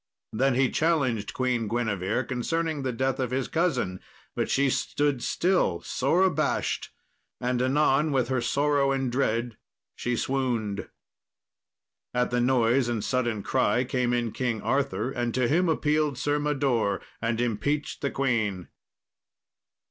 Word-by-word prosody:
Then 130 +3 +2
he 130 0 +2
challenged 135 -10 +1
Queen 125 -3 0
Guinevere 110 -1 -1
concerning 155 +5 -2
the 130 -1 -1
death 130 +2 -1
of 130 -2 0
his 130 0 -1
cousin, 130 - 0 0.4
but - - -1
she 140 0 +2
stood 145 0 0
still, 175 - +1
sore 160 +8 +1
abashed, 155 -6 0 0.5
and 125 0 0
anon 145 +3 +2
with 130 -4 +1
her 130 -2 +1
sorrow 140 +2 +2
and 135 -2 -1
dread, 120 -3 0 0.4
she 120 0 -2
swooned. 120 -6 -1 1.3
At 125 0 +1
the 120 0 +1
noise 120 0 +3
and 115 -3 -2
sudden 120 -5 -1
cry 125 -2 +2
came 125 -1 0
in 120 -2 0
King 120 -2 -2
Arthur, 130 -4 0
and 120 -3 -2
to 130 -1 +2
him 170 +6 +2
appealed 150 -3 +1
Sir 145 +3 0
Mador, 135 -9 +1 0.2
and 115 0 -1
impeached 120 +6 -1
the 140 - 0
queen. 110 -10 -1
130 Hz, 140 wpm, -27 LUFS, 120-140 Hz, 1.3 s, noise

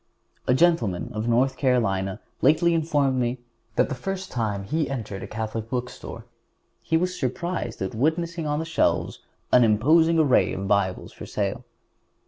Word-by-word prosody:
A 125 - +4
gentleman 130 - +2
of 110 +2 -3
North 130 +3 +2
Carolina 100 -7 +1 0.2
lately 160 +5 +4
informed 145 -5 +1
me 120 +1 0 0.4
that - - +3
the - - -3
first 190 +8 -5
time 105 -5 -2
he 155 +10 -1
entered 110 -7 -5
a - - -6
Catholic 110 0 -4
bookstore 125 0 -5 0.6
he 160 - +1
was 180 +2 -1
surprised 135 - -3
at 95 - -4
witnessing 160 +6 0
on 150 0 0
the 160 - -2
shelves 160 - 0 0.3
an 125 - +6
imposing 155 +10 +4
array 150 -5 +3
of 95 +1 -4
Bibles 100 -2 0
for - - -9
sale. - - -2
130 Hz, 155 wpm, -25 LUFS, 110-160 Hz, 0.6 s, an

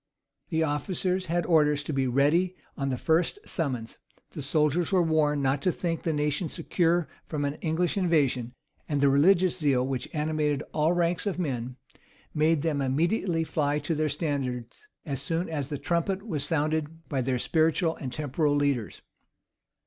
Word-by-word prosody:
The 160 -1 +1
officers 180 +5 -1
had 170 +1 0
orders 150 -3 +3
to 150 - -4
be 135 -1 +1
ready 150 +8 +2 0.2
on 135 -1 -2
the 130 - -1
first 165 - +1
summons: 130 -9 -3 0.3
the - - -6
soldiers 150 +4 +1
were 185 -2 +4
warned 150 -3 +2
not 135 +1 +1
to 180 - +2
think 165 -1 -2
the 165 - -1
nation 150 +2 0
secure 170 -1 +1 0.2
from 145 -2 -2
an 140 - -1
English 170 +4 0
invasion: 140 -9 +1 0.4
and 145 -2 0
the 140 0 +4
religious 180 +6 +4
zeal 135 -5 +2
which 130 -2 -3
animated 150 -1 0
all 155 +2 +2
ranks 175 +2 0
of 195 - -1
men, 130 -7 -3 0.6
made 155 -1 +2
them 150 -4 0
immediately 165 +5 +1
fly 150 -2 0
to 165 - -2
their 155 0 0
standards 140 - -3 0.2
as 140 -5 -3
soon 165 +2 -1
as 145 -4 -3
the 145 - -3
trumpet 185 +6 -1
was 155 -10 -2
sounded 155 +1 -1
by 135 -3 -1
their 130 0 0
spiritual 160 +4 +1
and 130 - -5
temporal 150 +1 0
leaders. 140 -6 -1
155 Hz, 165 wpm, -27 LUFS, 140-170 Hz, 0.6 s, were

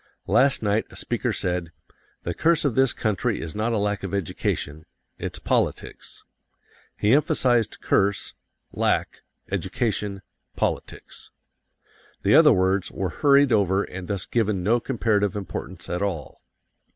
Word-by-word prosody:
Last 135 -3 +3
night 105 +1 +1
a - - -14
speaker - - -2
said: 90 -2 -2 0.5
"The 85 - -2
curse 165 - +2
of 140 - +2
this 130 +1 +3
country 110 +1 -1
is 80 -1 -6
not 110 +3 -1
a 115 - +1
lack 105 0 -1
of 100 0 -3
education. 80 -4 -3 0.3
It's - - -5
politics." - - -2 0.7
He 105 +3 +3
emphasized 135 - +2
curse, 100 +1 +1 0.4
lack, - - 0 0.3
education, 100 -4 -2 0.3
politics. - - -4 0.9
The - - +3
other - - +8
words 95 0 +2
were 95 -1 -2
hurried 140 - +4
over 100 -2 +3
and 95 -1 -8
thus 100 -3 -3
given 105 -5 0
no 115 +5 +3
comparative 110 -5 0
importance 95 -3 -6
at 90 +1 -3
all. 90 -8 -4
100 Hz, 135 wpm, -24 LUFS, 95-120 Hz, 0.9 s, other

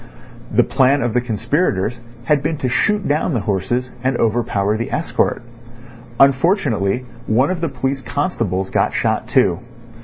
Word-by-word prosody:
The - - +4
plan 135 +1 +2
of 120 -2 -1
the 125 - +2
conspirators 120 - -1 0.2
had 145 +3 +2
been 155 +2 -2
to 130 - -2
shoot 205 +11 +1
down 150 +1 0
the 115 - 0
horses 115 +6 -1
and 130 -1 +1
overpower 110 -3 0
the 115 +2 -4
escort. - - -1 0.8
Unfortunately, 130 - +2 0.2
one 130 +9 +2
of 180 -3 -3
the 165 - 0
police 135 +1 -2
constables 110 - -2
got - - +1
shot - - 0
too. 85 - +2
125 Hz, 150 wpm, -19 LUFS, 110-145 Hz, 0.8 s, The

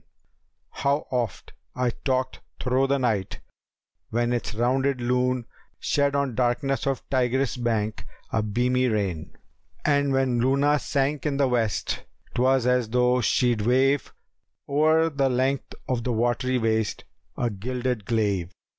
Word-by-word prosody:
[FN#283] - - -6
How 140 +2 +1
oft 120 -5 -3 0.2
I 125 -1 +1
talked 130 +1 -2 0.2
thro' 130 +1 +1
the 140 +1 +2
night, 110 -7 -1 0.7
when 120 +1 0
its 120 -1 -3
rounded 130 +3 +1
Lune 125 0 0 0.2
* - - -39
Shed 140 -1 +1
on 140 -3 0
darkness 130 +2 0
of 135 -3 -2
Tigris' 130 -1 +1
bank 110 -3 -2 0.3
a 110 - +2
beamy 125 +4 +1
rain! 100 -8 -2 0.5
And 145 -1 +2
when 130 -2 +1
Luna 140 +3 +3
sank 140 +2 -1
in 140 -2 -1
the 140 -1 +3
West 115 -6 -1 0.3
'twas 130 0 +2
as 125 -2 +2
though 125 +1 +3
she'd 120 +1 +2
wave 130 +4 +2 0.3
* - - -56
O'er 155 +3 +3
the 140 -2 +1
length 130 +2 -1
of 125 -2 -1
the 125 - -1
watery 120 +3 +1
waste 110 -2 0 0.3
a 120 -2 0
gilded 125 +2 -3
glaive." 100 -6 0
125 Hz, 145 wpm, -25 LUFS, 115-135 Hz, 0.7 s, Luna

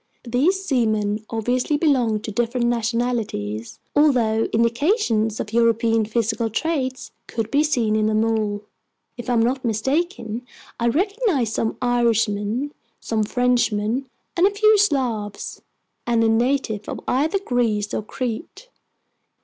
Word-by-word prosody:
These 310 +11 +1
seamen 215 - 0
obviously 245 +6 0
belonged 250 -9 +2
to 220 - -4
different 240 +3 0
nationalities, 230 - -2 0.2
although 240 -7 +3
indications 230 - +1
of 215 - -5
European 230 -1 +3
physical 225 +1 -1
traits 260 +1 -2 0.2
could 225 -1 -3
be 285 +2 +4
seen 240 -8 +1
in 215 0 +2
them 215 +1 +2
all. 215 -2 -1 0.5
If 240 +1 -7
I'm 235 -2 +3
not 255 +3 0
mistaken, 240 - -1 0.4
I 235 - +1
recognized 350 - +1
some 220 - -1
Irishmen, 235 +1 +1 0.3
some 220 -1 -1
Frenchmen, 245 +1 0 0.3
a 365 +2 +4
few 430 +1 +4
Slavs, 245 - -1 0.5
and 230 -1 +3
a 225 - +3
native 230 -2 0
of - - -4
either 300 +9 +1
Greece 230 - 0
or - - -1
Crete. 255 - -5
235 Hz, 125 wpm, -22 LUFS, 220-265 Hz, 0.5 s, be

